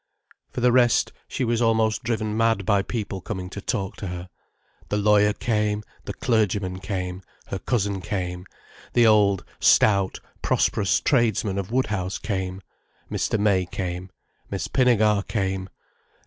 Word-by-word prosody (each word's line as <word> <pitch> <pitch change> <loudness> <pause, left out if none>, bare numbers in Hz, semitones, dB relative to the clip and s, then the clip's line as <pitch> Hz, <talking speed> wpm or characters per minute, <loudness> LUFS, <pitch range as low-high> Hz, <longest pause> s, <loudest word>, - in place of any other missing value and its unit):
For - - -5
the 125 0 +4
rest, 120 -1 +3
she - - -3
was 120 -1 +1
almost 110 -1 +2
driven 110 -2 -1
mad 115 -3 +2
by 100 -1 +3
people 100 -3 -4
coming 95 -3 -5
to 100 - -6
talk 100 -3 -3
to 100 - -5
her. 90 0 -6 0.6
The 105 - 0
lawyer 105 0 +4
came, 105 -1 -1 0.2
the - - -5
clergyman 105 -5 0
came, 90 -1 -4 0.3
her 95 - -3
cousin 100 -5 -1
came, 90 0 -4 0.5
the 120 -1 +5
old, 100 -4 +4
stout, 100 -3 +4 0.2
prosperous 100 -4 +2
tradesmen 110 -6 +1
of 100 +2 -5
Woodhouse 105 -7 -1
came, 95 -2 -3 0.5
Mr. 110 - 0
May 100 -3 +2
came, 90 0 -4 0.4
Miss 95 0 -3
Pinnegar 110 -4 +3
came. 95 -3 -2
100 Hz, 140 wpm, -24 LUFS, 95-110 Hz, 0.6 s, the